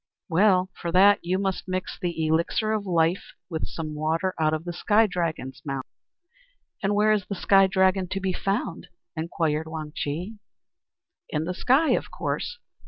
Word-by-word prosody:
"Ah, - - -68
well! 185 0 +4
For 170 - -5
that 200 +2 +6
you 180 +2 0
must 195 -1 -2
mix 185 0 -3
the 170 -4 -2
elixir 170 +7 +1
of 210 -2 -2
life 170 +1 +1 0.2
with 160 - -2
some 155 -2 -5
water 160 +5 -1
out 155 -1 +3
of 155 +1 -3
the 175 - -4
Sky 210 +5 +3
Dragon's 160 -9 -3
mouth." 135 -2 -4 1.0
"And 200 +1 +1
where 210 +1 +4
is 210 -3 +1
the 200 - -3
Sky 195 +1 +5
Dragon 190 0 +2
to 190 +2 -3
be 190 -1 -1
found?" 195 -2 -2 0.3
inquired 160 -1 -1
Wang 155 -1 -6
Chih. 180 +9 -4 0.9
"In 150 0 -1
the 180 +3 -3
sky, 270 - +3
of - - 0
course. 485 - -3
180 Hz, 170 wpm, -25 LUFS, 160-195 Hz, 1.0 s, that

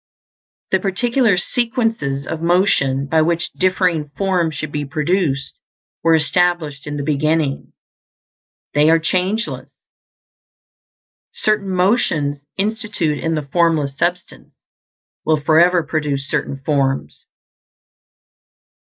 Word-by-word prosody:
The 190 - +3
particular 220 +3 +1
sequences 225 - -1
of 160 - -5
motion 165 -6 +2
by 160 +3 +2
which 165 +1 0
differing 180 -5 0
forms 180 -5 0
should 155 -2 -5
be 150 0 -2
produced 150 -1 -1 0.4
were 165 0 +4
established 155 -1 0
in 145 0 -4
the 145 - -3
beginning; 150 0 0 1.0
they 150 +2 +4
are 165 - +6
changeless. 185 +7 -1 1.6
Certain 210 -2 0
motions 180 -7 +1 0.2
instituted 210 -7 -1
in 165 0 0
the 155 - -2
Formless 160 -5 +2
Substance 175 +3 -3 0.7
will 155 -1 +2
forever 170 +4 +4
produce 145 -3 -2
certain 135 -1 -3
forms. 135 - -1
165 Hz, 100 wpm, -19 LUFS, 145-185 Hz, 1.6 s, are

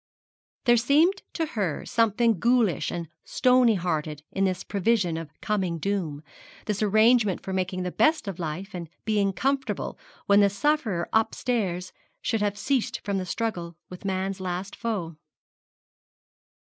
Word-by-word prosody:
There 240 -1 +6
seemed 310 - +3
to 325 - 0
her 200 - -2
something 230 -2 +2
ghoulish 235 - +2
and 170 -1 -4 0.2
stony 250 -3 +4
hearted 155 -4 -2
in 195 - +1
this 185 -1 -1
prevision 200 -4 +1
of 165 -2 -5
coming 190 -6 -1
doom, 165 -5 -2 0.4
this 210 -1 -2
arrangement 215 -1 +4
for 190 - -4
making 185 0 -1
the 180 - -3
best 310 - +2
of 190 -2 -5
life 175 +5 -4
and 170 -3 -6 0.2
being 205 -2 +2
comfortable 265 0 -2 0.3
when 200 0 +5
the 200 -1 +5
sufferer 210 - 0
upstairs 215 -5 0 0.3
should 225 - -1
have 205 -1 0
ceased 260 +2 0
from 200 -2 -1
the 185 - -4
struggle 175 -7 -3
with 180 - -9
man's 190 0 -2
last 185 +1 -4
foe. 190 -9 -3
200 Hz, 145 wpm, -26 LUFS, 180-230 Hz, 0.4 s, There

